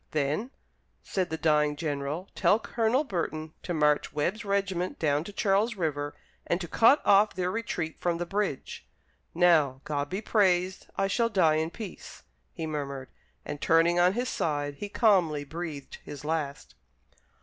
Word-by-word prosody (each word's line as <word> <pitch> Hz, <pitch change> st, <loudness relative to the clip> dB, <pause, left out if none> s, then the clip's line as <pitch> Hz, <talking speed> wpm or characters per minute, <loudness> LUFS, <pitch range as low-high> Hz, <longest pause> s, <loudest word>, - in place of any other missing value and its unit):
"Then," 155 Hz, -, 0 dB, 0.5 s
said 185 Hz, -2 st, -2 dB
the 160 Hz, -, -3 dB
dying 150 Hz, -2 st, +2 dB
general, 150 Hz, +3 st, -3 dB
"tell 205 Hz, -, +3 dB
Colonel 230 Hz, +4 st, +1 dB
Burton 160 Hz, -, -3 dB
to -, -, -5 dB
march 150 Hz, -3 st, +2 dB
Webb's 175 Hz, +10 st, -1 dB
regiment 195 Hz, -3 st, -1 dB
down 150 Hz, -1 st, +1 dB
to 205 Hz, -, -7 dB
Charles 205 Hz, +3 st, +1 dB
River, 145 Hz, -5 st, -2 dB, 0.3 s
to 175 Hz, 0 st, 0 dB
cut 230 Hz, -, +5 dB
off 205 Hz, +2 st, +5 dB
their 180 Hz, 0 st, -1 dB
retreat 180 Hz, -8 st, -3 dB
from 175 Hz, -1 st, 0 dB
the 175 Hz, -, -3 dB
bridge. 195 Hz, -6 st, -3 dB, 0.5 s
Now, 155 Hz, -7 st, +4 dB
God 145 Hz, -1 st, -2 dB
be 190 Hz, -, -2 dB
praised, 185 Hz, -4 st, +2 dB
I 195 Hz, -, +1 dB
shall 230 Hz, +4 st, +1 dB
die 165 Hz, -7 st, +3 dB
in 160 Hz, +1 st, 0 dB
peace," 205 Hz, +2 st, -9 dB, 0.3 s
he 165 Hz, -, -5 dB
murmured; 140 Hz, -4 st, -4 dB, 0.4 s
and 145 Hz, -, -6 dB
turning 170 Hz, +1 st, +4 dB
on 180 Hz, +1 st, +5 dB
his 245 Hz, +3 st, -1 dB
side 145 Hz, -, -1 dB
he 205 Hz, -, -5 dB
calmly 180 Hz, -10 st, +3 dB
breathed 150 Hz, -2 st, -7 dB
his 145 Hz, 0 st, -9 dB
last. 150 Hz, -3 st, -3 dB
170 Hz, 155 wpm, -28 LUFS, 150-195 Hz, 0.5 s, cut